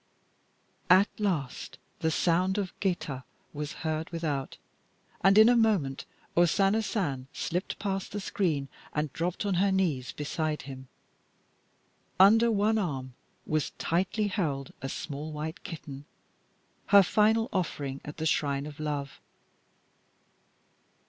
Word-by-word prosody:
At 190 +3 +7
last 170 -11 -2 0.2
the 160 - +1
sound 180 +4 +2
of 195 -3 -2
geta 155 -9 -2 0.3
was 150 0 -4
heard 155 0 -1
without, 155 -5 -3 0.7
and 195 +2 +6
in 220 +1 +9
a 245 - +6
moment 200 - +2 0.3
O 175 - +6
Sana 195 +5 +3
San 145 - -2
slipped 180 +3 -3
past 195 -2 -3
the 205 - -3
screen 165 -8 -1 0.3
and 150 -2 -1
dropped 175 +4 -2
on 200 - +1
her 200 0 +3
knees 160 -10 0
beside 155 +1 -2
him. 130 -1 -9 1.3
Under 225 +5 +7
one 215 0 +2
arm 135 -9 -3 0.3
was 155 -2 -1
tightly 190 +5 0
held 150 -9 -2
a 135 - -3
small 150 +2 -5
white 155 +5 -5
kitten, 145 -4 -8 0.8
her 200 -1 +8
final 220 +4 +3
offering 145 -7 -2
at 150 - -8
the 160 - -3
shrine 145 -3 +1
of 150 -1 -9
love. 145 -3 -4
165 Hz, 130 wpm, -29 LUFS, 145-195 Hz, 1.3 s, in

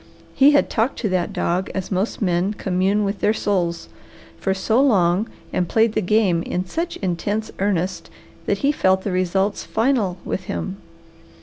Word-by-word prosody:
He 275 +1 +6
had 290 - +4
talked 230 +4 0
to 215 - 0
that 185 0 0
dog, 185 -1 -1
as 190 0 -4
most 195 +4 -1
men 180 +2 +1
commune 195 +2 +1
with 200 0 -2
their 215 - +2
souls, 175 -6 -1 0.5
for 190 - 0
so 220 +6 +2
long 195 -5 +3 0.3
and 180 -2 0
played 225 -1 +3
the 215 - +1
game 195 -3 +2
in 180 +2 -3
such 335 - -3
intense 205 +5 -2
earnest 190 -2 -1 0.4
that - - +1
he 285 - +5
felt 190 -8 +2
the 200 - -2
results 190 +2 0
final 220 -6 0
with 190 - -3
him. 195 0 -4
195 Hz, 170 wpm, -21 LUFS, 180-215 Hz, 0.5 s, He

